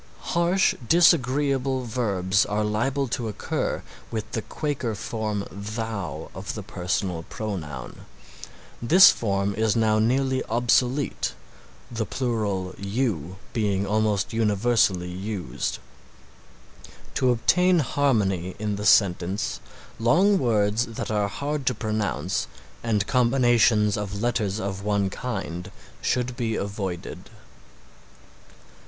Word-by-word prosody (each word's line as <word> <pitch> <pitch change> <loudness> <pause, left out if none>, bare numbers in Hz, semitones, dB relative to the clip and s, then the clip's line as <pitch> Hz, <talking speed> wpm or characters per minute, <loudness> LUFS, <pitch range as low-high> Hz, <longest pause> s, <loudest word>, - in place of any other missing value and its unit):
Harsh, 175 +3 +3 0.2
disagreeable 135 -5 +3
verbs 100 -5 +1
are 105 +1 0
liable 130 +6 0
to 120 -1 -2
occur 105 - -2 0.3
with 110 -2 -4
the 110 - -2
Quaker 130 -4 -3
form 105 -1 -3
Thou 100 -5 -5
of 95 +2 -6
the 105 - -6
personal 90 -2 -2
pronoun. 80 - -6 0.7
This 180 +11 +8
form 100 -2 -1
is 110 0 +1
now 110 -1 +3
nearly 130 +3 +1
obsolete, 125 +4 +1 0.6
the 115 -2 -2
plural 105 -7 -2
you 100 - -2 0.2
being 100 -3 0
almost 105 -1 0
universally 105 -4 +2
used. 95 - -4 1.4
To 130 - +2
obtain 180 +10 +3
harmony 105 - +1
in 105 -1 -2
the 105 0 -1
sentence 95 -1 +2 0.4
long 185 - +4
words 110 -1 +1
that 115 -1 -5
are 105 -1 +1
hard 140 +5 -3
to 125 - +2
pronounce 100 -9 -2 0.4
and 105 -3 +1
combinations 120 -4 +3
of 100 0 -4
letters 110 -3 0
of 100 -1 -4
one 100 -2 +1
kind 90 -7 -5 0.3
should 125 0 0
be 115 -3 -1
avoided. 100 -4 -5
110 Hz, 110 wpm, -25 LUFS, 100-125 Hz, 1.4 s, This